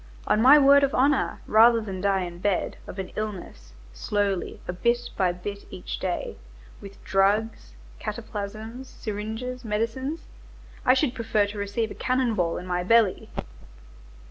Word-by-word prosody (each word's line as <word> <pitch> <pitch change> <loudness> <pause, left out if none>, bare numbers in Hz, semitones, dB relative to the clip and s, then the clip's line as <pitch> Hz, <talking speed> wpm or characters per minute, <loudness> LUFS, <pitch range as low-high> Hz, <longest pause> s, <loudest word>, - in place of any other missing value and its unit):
On 215 - +2
my 270 +5 +9
word 280 0 +7
of 275 -1 +1
honor, 275 +2 +2
rather 230 +2 +6
than 195 -4 -5
die 195 -1 +2
in 175 -1 -7
bed, 195 -1 0
of - - -8
an 190 -1 -5
illness, 185 - -6 0.2
slowly, 200 - -1
a 180 - -2
bit 235 +6 0
by 185 -2 +2
bit 200 +3 -7
each 90 -10 -6
day, - - -3 0.4
with 200 0 -12
drugs, 195 - +1 0.2
cataplasms, 220 +5 -6
syringes, 220 +5 -5
medicines, 230 +8 -2 0.7
I 255 - +7
should 265 -2 +1
prefer 225 -4 +1
to 205 +1 -7
receive 205 +3 -2
a - - -4
cannon 255 -2 0
ball 175 -5 0
in 180 - -6
my 180 -1 -1
belly!" 225 0 +3
210 Hz, 150 wpm, -25 LUFS, 195-240 Hz, 0.7 s, my